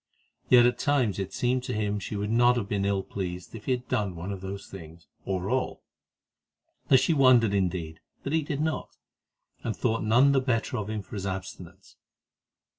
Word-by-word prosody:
Yet 120 Hz, -1 st, +7 dB
at 125 Hz, -, +1 dB
times 130 Hz, -9 st, +1 dB
it 95 Hz, -, 0 dB
had 95 Hz, -, -18 dB
seemed 125 Hz, +1 st, 0 dB
to 125 Hz, -, -3 dB
him 105 Hz, -1 st, 0 dB
that 105 Hz, -, -2 dB
she 105 Hz, -, -5 dB
would 105 Hz, +1 st, -2 dB
not 120 Hz, +1 st, +4 dB
have 105 Hz, -4 st, -2 dB
been 100 Hz, -1 st, -1 dB
ill 100 Hz, -1 st, 0 dB
pleased 90 Hz, -2 st, -6 dB
if 110 Hz, -2 st, -9 dB
he -, -, -1 dB
had 125 Hz, -1 st, -4 dB
done 100 Hz, -4 st, -1 dB
one 85 Hz, +4 st, -5 dB
of 95 Hz, -2 st, -6 dB
these 95 Hz, +1 st, -6 dB
things, 85 Hz, -3 st, -11 dB, 0.2 s
or 95 Hz, -1 st, -2 dB
all; 130 Hz, +4 st, -1 dB, 1.0 s
that 135 Hz, -, +7 dB
she 165 Hz, -, +2 dB
wondered, 130 Hz, -7 st, +5 dB
indeed, 90 Hz, -5 st, -1 dB, 0.2 s
that 140 Hz, -, -3 dB
he 160 Hz, -, +3 dB
did 145 Hz, -1 st, -3 dB
not, 160 Hz, 0 st, -3 dB, 0.7 s
and 115 Hz, -, -2 dB
thought 115 Hz, -3 st, 0 dB
none 120 Hz, +6 st, +5 dB
the 135 Hz, -1 st, +3 dB
better 125 Hz, -1 st, -1 dB
of 105 Hz, -1 st, -4 dB
him 110 Hz, -2 st, -3 dB
for -, -, -16 dB
his 100 Hz, -1 st, -3 dB
abstinence. 95 Hz, 0 st, -8 dB
105 Hz, 205 wpm, -27 LUFS, 95-125 Hz, 1.0 s, Yet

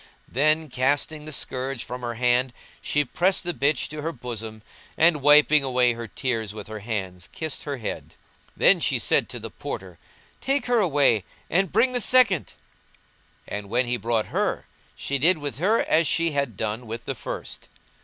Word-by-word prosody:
Then, 155 Hz, +4 st, +1 dB
casting 145 Hz, +4 st, 0 dB
the 155 Hz, -, -7 dB
scourge 130 Hz, -2 st, -2 dB
from 125 Hz, +1 st, -6 dB
her 120 Hz, -1 st, -4 dB
hand, 125 Hz, +1 st, +1 dB, 0.3 s
she 145 Hz, 0 st, +1 dB
pressed 185 Hz, +5 st, +1 dB
the 175 Hz, 0 st, -3 dB
bitch 140 Hz, -2 st, +1 dB
to 150 Hz, 0 st, -6 dB
her 160 Hz, +2 st, -2 dB
bosom 115 Hz, -5 st, -7 dB, 0.3 s
and, 160 Hz, -2 st, +4 dB
wiping 150 Hz, +1 st, +6 dB
away 125 Hz, -2 st, +2 dB
her 115 Hz, 0 st, -7 dB
tears 115 Hz, -5 st, -3 dB
with 105 Hz, -, -7 dB
her 110 Hz, 0 st, -7 dB
hands, 95 Hz, -5 st, -5 dB
kissed 160 Hz, -3 st, -4 dB
her 145 Hz, -2 st, -3 dB
head. 115 Hz, -, -6 dB, 0.4 s
Then -, -, +5 dB
she -, -, +1 dB
said -, -, +2 dB
to -, -, -5 dB
the -, -, -8 dB
Porter, -, -, -7 dB, 0.4 s
"Take 270 Hz, -1 st, 0 dB
her 245 Hz, -1 st, +2 dB
away 140 Hz, -, +3 dB, 0.3 s
and 185 Hz, +1 st, +2 dB
bring 255 Hz, +1 st, +3 dB
the 245 Hz, -, +1 dB
second;" 220 Hz, -, +4 dB, 0.9 s
and, 105 Hz, -1 st, -6 dB
when 120 Hz, +3 st, +1 dB
he 120 Hz, +1 st, -1 dB
brought 115 Hz, -2 st, -1 dB
her, -, -, -1 dB, 0.3 s
she 140 Hz, 0 st, -2 dB
did 170 Hz, +5 st, +4 dB
with 145 Hz, -4 st, -5 dB
her 210 Hz, +7 st, +3 dB
as 160 Hz, 0 st, +2 dB
she 165 Hz, 0 st, +1 dB
had 140 Hz, -8 st, -2 dB
done 110 Hz, +3 st, -3 dB
with 115 Hz, +2 st, -6 dB
the 135 Hz, -, -2 dB
first. 125 Hz, -, -7 dB
135 Hz, 180 wpm, -24 LUFS, 115-155 Hz, 0.9 s, wiping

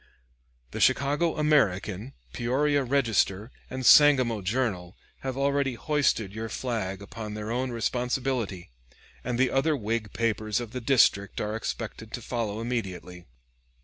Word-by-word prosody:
The -, -, -5 dB
Chicago 145 Hz, +5 st, +2 dB
"American," 115 Hz, -6 st, +1 dB, 0.2 s
Peoria 140 Hz, +4 st, +1 dB
"Register," 115 Hz, -5 st, +1 dB, 0.2 s
and 130 Hz, 0 st, -5 dB
Sangamo 130 Hz, -8 st, +6 dB
"Journal" 95 Hz, -4 st, -2 dB, 0.2 s
have 130 Hz, -1 st, -4 dB
already 140 Hz, -2 st, +1 dB
hoisted 140 Hz, -8 st, 0 dB
your 110 Hz, +1 st, -5 dB
flag 100 Hz, -5 st, -3 dB
upon 105 Hz, +1 st, -7 dB
their 105 Hz, +1 st, -5 dB
own 125 Hz, +2 st, -1 dB
responsibility; 120 Hz, -, -2 dB, 0.5 s
and 120 Hz, -1 st, -2 dB
the 130 Hz, 0 st, +2 dB
other 145 Hz, +3 st, +2 dB
Whig 110 Hz, -2 st, -2 dB
papers 110 Hz, -2 st, 0 dB
of 120 Hz, -3 st, -6 dB
the 125 Hz, -, -5 dB
district 115 Hz, -6 st, +3 dB
are 105 Hz, +1 st, -2 dB
expected 110 Hz, -1 st, -5 dB
to 120 Hz, -, -4 dB
follow 110 Hz, -3 st, -3 dB
immediately. 95 Hz, -7 st, -5 dB
115 Hz, 130 wpm, -27 LUFS, 105-130 Hz, 0.5 s, Sangamo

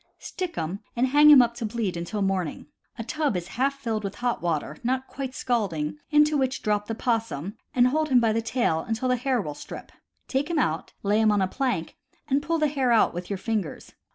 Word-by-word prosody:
Stick 365 Hz, -2 st, -5 dB
him, 165 Hz, +4 st, -3 dB, 0.2 s
and 245 Hz, +2 st, +2 dB
hang 295 Hz, +2 st, +7 dB
him 280 Hz, -4 st, +10 dB
up 235 Hz, 0 st, -1 dB
to 235 Hz, -1 st, -4 dB
bleed 215 Hz, -5 st, -2 dB
until 175 Hz, +5 st, -3 dB
morning. 190 Hz, -5 st, -2 dB, 0.3 s
A 230 Hz, -, -4 dB
tub 290 Hz, -3 st, -1 dB
is 175 Hz, 0 st, -6 dB
half 275 Hz, +3 st, 0 dB
filled 225 Hz, -5 st, -2 dB
with 200 Hz, -1 st, -4 dB
hot 245 Hz, 0 st, -1 dB
water 155 Hz, -3 st, -2 dB
(not 260 Hz, +2 st, 0 dB
quite 265 Hz, -1 st, -6 dB
scalding) 165 Hz, -11 st, -1 dB
into 300 Hz, 0 st, +4 dB
which 265 Hz, -1 st, -1 dB
drop 210 Hz, -1 st, 0 dB
the 225 Hz, -, -3 dB
possum 220 Hz, -, -2 dB, 0.2 s
and 250 Hz, 0 st, +5 dB
hold 310 Hz, +3 st, 0 dB
him 255 Hz, -2 st, +5 dB
by 225 Hz, -2 st, +2 dB
the 230 Hz, -, +1 dB
tail 230 Hz, -8 st, 0 dB
until 225 Hz, +8 st, -2 dB
the 250 Hz, -, +3 dB
hair 250 Hz, 0 st, 0 dB
will 150 Hz, -8 st, -4 dB
strip. -, -, -9 dB, 0.4 s
Take 280 Hz, +4 st, -1 dB
him 340 Hz, -, -1 dB
out, 160 Hz, -, 0 dB
lay 210 Hz, +2 st, +2 dB
him 215 Hz, -1 st, +4 dB
on 205 Hz, -, +2 dB
a -, -, +1 dB
plank, 240 Hz, -6 st, -2 dB, 0.3 s
and 280 Hz, 0 st, +2 dB
pull 330 Hz, +3 st, 0 dB
the 305 Hz, -1 st, +2 dB
hair 270 Hz, -4 st, 0 dB
out 230 Hz, -, +4 dB
with 175 Hz, +1 st, -6 dB
your 200 Hz, -, -2 dB
fingers. 210 Hz, -5 st, -3 dB
230 Hz, 225 wpm, -26 LUFS, 195-265 Hz, 0.4 s, him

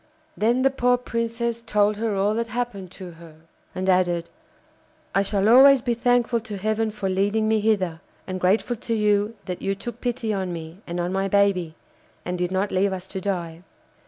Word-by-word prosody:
Then 235 Hz, +4 st, +2 dB
the 270 Hz, -, +4 dB
poor 250 Hz, -2 st, +2 dB
Princess 235 Hz, -1 st, -3 dB
told 210 Hz, -2 st, +1 dB
her 220 Hz, -1 st, -1 dB
all 200 Hz, +2 st, +1 dB
that 230 Hz, +1 st, -1 dB
happened 230 Hz, -5 st, -4 dB
to 185 Hz, -2 st, -9 dB
her, 165 Hz, -1 st, -14 dB, 0.4 s
and 185 Hz, +1 st, -3 dB
added 175 Hz, -2 st, +2 dB, 0.8 s
'I 195 Hz, -, +3 dB
shall 200 Hz, 0 st, 0 dB
always 265 Hz, +2 st, +7 dB
be 240 Hz, -2 st, +1 dB
thankful 240 Hz, 0 st, +2 dB
to 215 Hz, -2 st, -7 dB
Heaven 215 Hz, +2 st, 0 dB
for 210 Hz, -2 st, -4 dB
leading 200 Hz, +3 st, +1 dB
me 220 Hz, 0 st, +2 dB
hither, 190 Hz, -6 st, 0 dB, 0.2 s
and 185 Hz, -1 st, -4 dB
grateful 205 Hz, +6 st, +1 dB
to 230 Hz, +1 st, -3 dB
you 210 Hz, +1 st, +1 dB
that 180 Hz, -1 st, -5 dB
you 195 Hz, 0 st, -1 dB
took 240 Hz, +4 st, -8 dB
pity 240 Hz, -3 st, -1 dB
on 190 Hz, -2 st, -2 dB
me 165 Hz, +1 st, -7 dB
and 175 Hz, +1 st, -4 dB
on 175 Hz, +1 st, -2 dB
my 195 Hz, 0 st, 0 dB
baby, 195 Hz, -5 st, +2 dB, 0.5 s
and 180 Hz, -, -2 dB
did 180 Hz, 0 st, -2 dB
not 190 Hz, +2 st, 0 dB
leave 195 Hz, +1 st, +2 dB
us 190 Hz, 0 st, -5 dB
to 190 Hz, -, -5 dB
die. 175 Hz, -4 st, -3 dB
205 Hz, 190 wpm, -24 LUFS, 185-230 Hz, 0.8 s, always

